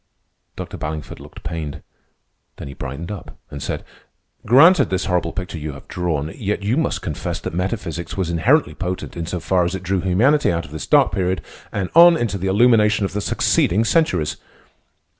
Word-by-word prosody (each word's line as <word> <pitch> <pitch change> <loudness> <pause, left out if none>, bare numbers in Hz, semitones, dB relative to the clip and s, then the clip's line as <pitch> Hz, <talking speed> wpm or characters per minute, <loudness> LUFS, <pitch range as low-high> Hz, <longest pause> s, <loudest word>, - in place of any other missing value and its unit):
Dr. - - -7
Ballingford 75 -1 -5
looked - - -13
pained, 80 -2 -5 0.7
then - - -8
he 70 - -8
brightened 70 +8 -6
up 100 - -9
and 70 - -7
said: - - -4 0.6
"Granted 145 - +6
this 95 0 -1
horrible 90 -3 0
picture 90 -3 -5
you 75 -1 -5
have 70 - -13
drawn, 80 -3 -2
yet 105 -1 -3
you 105 +5 +1
must 160 +2 -1
confess 75 - -4
that - - -5
metaphysics 90 -3 -3
was 90 -3 -1
inherently 130 - +2
potent 90 -1 -5
in 85 -2 -4
so 90 0 -3
far 90 +2 +1
as 85 +2 -1
it 95 - -6
drew 95 0 0
humanity 115 - +3
out 85 0 -2
of - - -13
this 80 - -6
dark - - +4
period 95 -1 0 0.3
and 95 -3 -3
on 170 0 +8
into 105 -8 -2
the 95 - -2
illumination 105 0 +4
of 95 - -4
the 105 - -2
succeeding 100 +1 +2
centuries." 110 - +1
95 Hz, 185 wpm, -20 LUFS, 85-105 Hz, 0.7 s, on